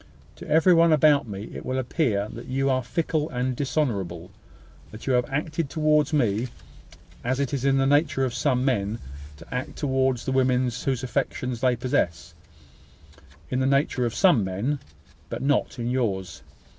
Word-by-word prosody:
To - - -10
every 160 +4 +5
one 165 0 +5
about 150 -3 +4
me 100 0 -7
it - - -7
will 130 - -2
appear 120 - 0
that - - -9
you 135 +1 0
are 130 0 +1
fickle 155 +3 -1
and 125 0 -2
dishonourable 100 - -2 0.6
that 110 - -11
you 135 - +1
have 125 +2 +1
acted 150 +2 -2
towards 150 -1 +2
me 120 -5 +1 0.8
as 130 +2 -1
it 140 0 -1
is 135 -1 -1
in 135 0 +3
the 135 - +2
nature 145 -1 +2
of 125 - -3
some 125 0 +1
men 110 -4 0 0.4
to 85 - -11
act 125 +1 -4
towards 130 -3 0
the 130 - -1
women 130 -1 +2
whose 130 -2 0
affections 125 -2 -2
they 130 -1 +3
possess; 85 -9 -1 1.2
in 130 - 0
the 130 - +1
nature 135 -2 +1
of 120 -1 -1
some 175 - +4
men, 105 +10 -2 0.5
but - - -4
not 140 -2 +1
in 120 -1 -3
yours. 110 -7 -2
130 Hz, 170 wpm, -25 LUFS, 120-145 Hz, 1.2 s, every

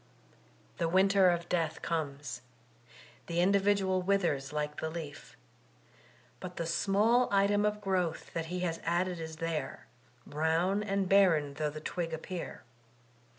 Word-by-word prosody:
The 165 -1 +1
winter 190 +1 +5
of 170 0 -1
death 165 -3 -1
comes; 145 -4 -3 0.9
the 170 0 -1
individual 195 0 +3
withers 175 -8 0
like 150 0 -3
the 160 - -2
leaf; 160 -3 -8 1.0
but 180 -1 -7
the 165 - -3
small 210 +8 +3
item 200 +1 +3
of 210 0 -2
growth 185 -4 -1
that 165 -1 -3
he 180 +2 -3
has 165 -2 -1
added 175 +1 0
is 160 -1 -6
there, 160 -4 -4 0.4
brown 165 +6 +1
and 195 -2 -1
barren 175 -7 +4
though 150 +1 -1
the 155 +1 -8
twig 165 0 -3
appear. 170 +2 -7
175 Hz, 135 wpm, -31 LUFS, 160-195 Hz, 1.0 s, winter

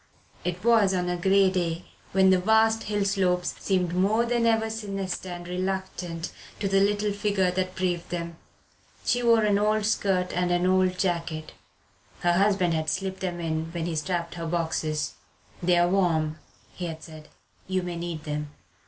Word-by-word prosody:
It 180 +1 -3
was 220 -5 +4
on 180 -1 0
a 180 - 0
grey 190 +2 +4
day, 170 -2 -2 0.3
when 190 0 +5
the 185 - +4
vast 220 +3 +3
hill 205 -1 0
slopes 185 -3 +1
seemed 180 -3 0
more 205 +6 +2
than 235 -1 +1
ever 225 -1 +2
sinister 195 -4 -4
and 175 0 -7
reluctant 180 -2 -3 0.3
to 200 - 0
the 195 0 +3
little 205 +1 +2
figure 200 -3 +1
that 185 0 -2
braved 180 -2 -1
them. 170 -1 -4 0.7
She 245 - +2
wore 230 -2 +4
an 205 -1 +3
old 215 0 +2
skirt 190 -4 +1
and 180 0 +1
an 175 0 +2
old 185 0 +3
jacket 170 -4 -2 0.7
her 175 0 +3
husband 190 -2 +3
had 160 -1 0
slipped 190 0 -2
them 180 -2 -3
in 160 -1 -2
when 170 -2 -2
he 170 -2 -2
strapped 170 +1 -2
her 170 -1 -5
boxes. 160 -2 -1 0.5
"They're 175 0 +4
warm," 160 -5 +1 0.3
he 180 - -5
had 160 -1 -7
said; 155 -1 -11 0.4
"you 185 -1 0
may 175 -1 -4
need 170 -2 -5
them." 150 -1 -3
180 Hz, 170 wpm, -26 LUFS, 170-195 Hz, 0.7 s, when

